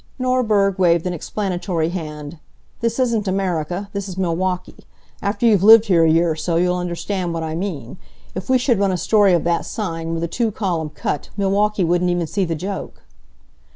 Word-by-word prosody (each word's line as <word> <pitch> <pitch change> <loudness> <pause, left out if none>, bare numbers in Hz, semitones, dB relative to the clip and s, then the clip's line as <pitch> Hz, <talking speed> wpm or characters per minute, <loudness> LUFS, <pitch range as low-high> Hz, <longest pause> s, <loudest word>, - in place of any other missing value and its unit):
Norberg 220 -7 +1
waved 170 -2 +3
an 180 - -1
explanatory 175 -2 -2
hand. 155 -3 -6 0.4
"This 230 0 -1
isn't 235 -5 0
America. 185 -1 -2
This 200 -1 -4
is 185 - -8
Milwaukee. 180 0 -2 0.3
After 205 +3 -1
you've 210 -5 +4
lived 220 +2 +8
here 175 -6 +4
a 165 - +4
year 165 +1 +3
or - - -2
so 165 +2 -2
you'll 180 +1 +2
understand 180 0 -3
what 165 - -3
I 160 0 -4
mean. 160 - -5 0.4
If 185 - -6
we 260 - +5
should 245 -3 +1
run 200 -1 +2
a 185 - -1
story 205 +1 +3
of 170 - +2
that 170 0 0
sign, 165 -6 -4
with 165 - -3
a - - 0
two 230 +6 -1
column 175 -7 -2
cut, 150 - -4
Milwaukee 200 +1 +1
wouldn't 175 +1 +1
even 175 -1 0
see 195 +4 -1
the 165 -1 -2
joke." 190 +5 -6
180 Hz, 190 wpm, -20 LUFS, 165-205 Hz, 0.4 s, lived